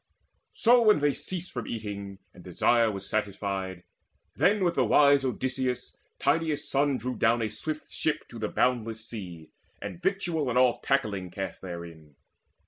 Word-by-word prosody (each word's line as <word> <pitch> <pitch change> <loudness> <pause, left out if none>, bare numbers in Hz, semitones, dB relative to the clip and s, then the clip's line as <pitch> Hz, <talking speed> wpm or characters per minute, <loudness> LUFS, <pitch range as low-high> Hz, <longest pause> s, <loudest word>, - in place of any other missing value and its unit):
So 240 +1 +5
when 215 -7 +5
they 145 -1 +2
ceased 180 -1 -5
From 125 - -5
eating, 100 -3 -5 0.2
and 90 - -14
desire 115 +5 +3
was 100 -1 -6
satisfied, 100 -3 -2 0.5
Then 200 +1 +3
with 175 -1 +2
the - - +2
wise 140 -1 +5
Odysseus 130 -1 -2 0.2
Tydeus' 155 +1 0
son 140 -1 +2
Drew 125 +2 -4
down 115 0 +2
a 110 - -1
swift 155 +8 -5
ship 155 - -1
to 115 - -9
the 110 - -2
boundless 115 -3 0
sea, 90 -9 -8 0.3
And 170 - -7
victual 175 -6 0
and 125 - 0
all 125 -1 +4
tackling 105 -9 0
cast 95 +2 -5
therein. 85 -5 -9
120 Hz, 155 wpm, -28 LUFS, 100-145 Hz, 0.5 s, So